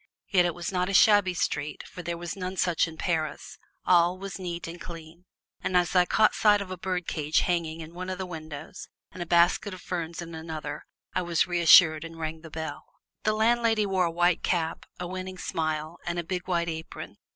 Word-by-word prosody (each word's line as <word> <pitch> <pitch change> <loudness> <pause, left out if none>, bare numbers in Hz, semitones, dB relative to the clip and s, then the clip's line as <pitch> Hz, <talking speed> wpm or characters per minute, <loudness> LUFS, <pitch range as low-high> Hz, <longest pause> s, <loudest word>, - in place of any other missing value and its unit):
Yet 180 -3 +4
it 175 - -1
was 175 +1 -4
not 180 0 0
a 195 - 0
shabby 205 -3 +6
street, 145 -3 -2
for 180 - -9
there 170 0 -4
are 175 - -7
none 185 0 -5
such 175 -3 +2
in 160 -1 -10
Paris; 160 -4 -2 0.3
all 175 0 +4
was 195 0 -7
neat 175 -2 -5
and 170 +1 -8
clean, 165 +1 -10 0.4
and 180 - +2
as 180 +1 +1
I 180 -1 +5
caught 215 -1 +4
sight 210 -1 +4
of 195 -2 -6
a - - -3
birdcage 175 -4 0
hanging 165 -2 -1
in 160 +1 -9
one 185 +1 -6
of 185 - -3
the 190 - -3
windows 155 -1 -8 0.2
and 185 - -9
a 175 - -4
basket 175 +3 +3
of 180 - -12
ferns 170 -2 -4
in 170 -1 -7
another 155 -2 -6 0.3
I 185 - +1
was 170 -2 +1
reassured 165 -2 +6
and 165 0 -9
rang 160 0 -4
the 165 - -10
bell. 160 -1 -5 0.4
The 215 - +3
landlady 225 0 +3
wore 190 -2 +2
a 170 - -1
white 175 0 +2
cap, 165 -2 -1
a 180 - -3
winning 185 +1 -6
smile 155 -1 -3
and 175 0 -1
a 175 - -1
big 180 +1 -4
white 170 -2 0
apron. 160 -1 -6
175 Hz, 210 wpm, -27 LUFS, 160-185 Hz, 0.4 s, shabby